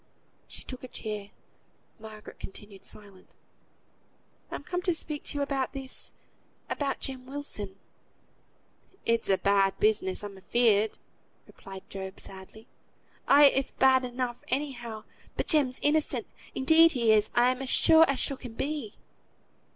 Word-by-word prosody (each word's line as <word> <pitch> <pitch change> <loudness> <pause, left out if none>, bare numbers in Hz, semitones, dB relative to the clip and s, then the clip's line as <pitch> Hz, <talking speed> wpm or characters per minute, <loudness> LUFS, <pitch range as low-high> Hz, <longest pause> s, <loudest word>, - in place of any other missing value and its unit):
She - - -9
took 255 0 -8
a - - -6
chair. 210 -4 -6 0.7
Margaret 215 -1 -11
continued 195 0 -10
silent. 200 -3 -9 1.1
"I'm - - -6
come 360 0 -3
to 355 -2 +1
speak 300 -2 -4
to - - -3
you 285 - +1
about 275 -2 -2
this 270 -1 -4 0.6
about 280 -2 -1
Jem 260 -1 -3
Wilson." 260 -9 -5 1.3
"It's 230 -2 +1
a 195 - +4
bad 195 -1 +3
business, 210 -3 +1
I'm 200 -2 -8
afeared," 220 +1 +3 0.5
replied 190 -1 -12
Job, 190 0 -7
sadly. 195 +3 -9 0.6
"Ay, 285 0 +8
it's 270 0 +1
bad 260 -1 +4
enough 245 -1 -3
anyhow. 240 -6 -3 0.3
But - - 0
Jem's 275 -5 +3
innocent. 305 +1 +1 0.3
Indeed 320 +4 +6
he 235 -4 +3
is; 215 -1 +4
I'm 250 +2 +3
as 265 - -4
sure 320 +4 +6
as 275 - 0
sure 275 - +1
can 245 -3 -9
be." 275 -4 -3
245 Hz, 135 wpm, -28 LUFS, 205-275 Hz, 1.3 s, Ay